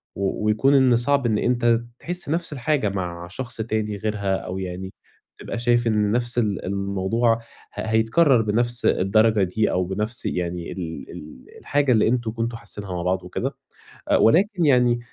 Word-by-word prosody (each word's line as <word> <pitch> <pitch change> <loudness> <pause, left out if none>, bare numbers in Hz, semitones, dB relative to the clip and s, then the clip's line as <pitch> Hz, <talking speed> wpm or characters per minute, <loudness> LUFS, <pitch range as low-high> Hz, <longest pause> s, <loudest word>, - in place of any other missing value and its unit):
و 100 +2 -2
ويكون 110 +7 +3
إن 130 -3 +5
صعب 135 +3 +1
إن 110 -3 +2
أنت 120 -1 +2 0.2
تحس 175 -3 -4
نَفس 165 -1 -1
الحاجة 140 -4 0
مع 90 -3 -4
شخص 120 +7 -7
تاني 110 -1 -2
غيرها، 100 -2 -1
أو 95 0 -5
يعني 95 +1 -6 0.5
تبقى 115 - -5
شايف 120 0 +2
إن 105 -2 +2
نَفس 120 +1 0
ال 105 -4 0
الموضوع 100 +4 0 0.4
ه - - -5
هيتكرر 115 +5 +3
بنَفس 120 +3 0
الدرجة 110 +2 +3
دي، 105 +4 0
أو 90 - +1
بنَفس 105 +6 -3
يعني 85 -1 -3
ال 85 -3 -6
ال 75 -4 -11
الحاجة 140 -1 +1
اللي 110 -3 +4
أنتم 115 -1 0
كنتم 115 +1 -3
حاسينها 100 -3 -8
مع 90 - -3
بعض 90 +1 -1
وكده. 90 - -4 0.5
أ - - +4
ولكن 185 - +3
يعني 125 -3 +4
110 Hz, 165 wpm, -23 LUFS, 95-120 Hz, 0.5 s, إن